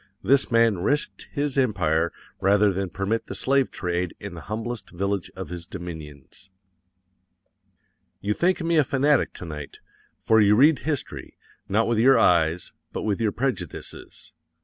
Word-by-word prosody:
THIS 135 +2 +3
MAN 115 -5 +3
RISKED 145 +11 -1
HIS 145 -2 -1
EMPIRE 85 - +1 0.3
rather 100 +1 +3
than 95 0 -2
permit 100 +5 -2
the - - -5
slave 135 0 +2
trade 90 -2 -3
in - - -7
the - - -8
humblest 115 +2 -4
village 100 0 -2
of - - -7
his 85 -1 -7
dominions._ 80 -2 -9 1.7
YOU 105 +1 -1
THINK 180 - +1
ME 165 0 +1
A 155 - +6
FANATIC 140 +2 +2
TO - - -7
NIGHT, 75 -3 -8 0.4
for 110 -1 +4
you 105 0 +5
read 140 +4 +5
history, 150 -3 -4 0.3
_not 110 +3 +2
with 115 -1 +1
your 130 +2 +6
eyes, 85 -4 +2 0.2
BUT - - -4
WITH 105 +1 -1
YOUR 110 -2 +2
PREJUDICES. 115 - -5
105 Hz, 150 wpm, -24 LUFS, 90-130 Hz, 1.7 s, A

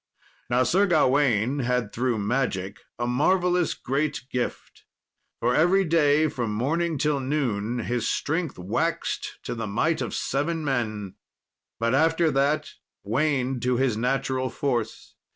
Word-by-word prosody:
Now 125 +1 +3
Sir 190 +10 +3
Gawain 135 - +2
had 125 -4 -1
through 125 -1 0
magic 105 -3 -1 0.2
a 120 - -1
marvellous 175 +7 +2
great 145 +2 -2
gift. 125 -1 -4 0.5
For 120 +1 +1
every 180 +7 +4
day, 155 -2 +3
from 120 -7 -3
morning 160 +7 0
till 150 0 +1
noon, 125 -5 -1
his 120 0 -1
strength 160 0 -1
waxed 90 +2 -2
to - - -4
the 115 -2 -4
might 155 +11 0
of - - -3
seven 155 +3 -1
men, 110 -7 -2 0.6
but 115 +1 +1
after 160 +3 +3
that 140 +2 +1 0.3
waned 130 +2 0
to 125 0 +1
his 130 -3 +1
natural 130 +2 -1
force. 125 -5 -3
130 Hz, 135 wpm, -25 LUFS, 120-155 Hz, 0.6 s, every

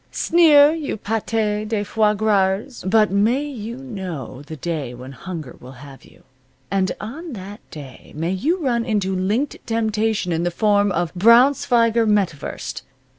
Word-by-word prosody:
Sneer, 305 -4 +5
you 310 -8 -4
pate 220 +1 -3 0.4
de 210 -2 -1
foies 210 0 +1
grasers! 205 +3 0
But 215 0 +4
may 220 +8 +2
you 235 -4 -6
know 185 - -7
the 150 +2 -9
day 150 -5 -4
when 130 +2 -10
hunger 160 -2 -8
will 130 +2 -12
have 135 0 -13
you. - - -21 0.5
And 190 -1 +1
on 295 +9 -7
that 200 0 -8
day 140 -4 -11
may 165 +3 -2
you 300 - 0
run 235 -3 +1
into 205 -5 -1
linked 210 +10 -1
temptation 220 -4 0
in 165 0 0
the 175 - 0
form 205 +2 +2
of 175 -2 -2
Braunschweiger 235 +2 +4
Metwurst. 195 -9 -2
205 Hz, 150 wpm, -21 LUFS, 175-230 Hz, 0.5 s, Sneer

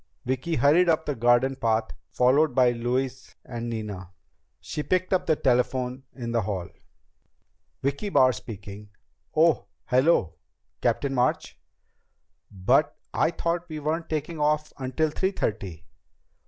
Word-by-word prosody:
Vicki 130 +6 -1
hurried 160 +5 +4
up 160 -1 +2
the 145 - -1
garden 120 +2 +3
path, 110 -3 0 0.2
followed 130 - +3
by 125 -2 +5
Louise 125 +2 -3
and 120 -1 -5
Nina. 105 -5 -5 0.5
She 150 - -5
picked 185 +4 0
up 185 -1 +1
the 155 - +4
telephone 125 -1 0
in 120 -3 -5
the 115 -1 +1
hall. 95 -3 -3 1.2
"Vicki 140 +10 -1
Barr 130 -8 +5
speaking.... 105 -1 -9 0.5
Oh, 160 0 +3 0.2
hello, 130 - +2 0.4
Captain 140 -1 0
March.... 125 -1 0 0.9
But 125 +10 +2 0.2
I - - +2
thought 170 +1 -2
we 155 - -5
weren't 160 +3 -2
taking 155 +1 -3
off 150 +1 +1
until 135 +4 0
three 190 +5 0
thirty. 90 - -3
130 Hz, 130 wpm, -26 LUFS, 115-155 Hz, 1.2 s, by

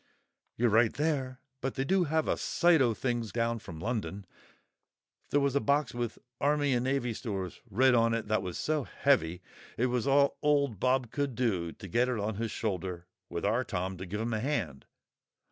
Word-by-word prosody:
"You're 120 -1 +3
right 115 +1 +5
there; 135 -4 -1 0.2
but 135 - -2
they 135 - 0
do 185 +5 +2
have 160 +1 0
a - - +2
sight 170 -3 +3
o' 120 -4 +3
things 120 -3 -2
down 115 0 0
from 85 -6 -9
London. 105 -1 -3 1.0
There 145 - +3
was 140 -1 +1
a - - +5
box 140 -1 +1
with 120 -2 -3 0.2
'Army 145 -1 +2
and 120 0 +1
Navy 130 -3 0
Stores' 100 -6 -5
writ 130 +6 +4
on 115 -1 +3
it 115 -2 -3
that 110 0 +1
was 90 -2 -5
so 155 -2 0
heavy, 90 - +1 0.3
it 120 - +2
was 125 +1 0
all 140 0 +3
old 140 -8 +2
Bob 125 0 +1
could 140 -4 -2
do 95 -10 0
to 100 - -10
get 120 +6 +2
it 125 - -1
on 105 0 -2
his 115 +1 -2
shoulder, 90 -5 -3 0.2
with 85 - -3
our 115 +5 +2
Tom 95 -3 -3
to 95 +2 -7
give 105 +4 -4
him 115 0 -2
a 110 - 0
hand. 100 - -2
120 Hz, 195 wpm, -30 LUFS, 105-140 Hz, 1.0 s, right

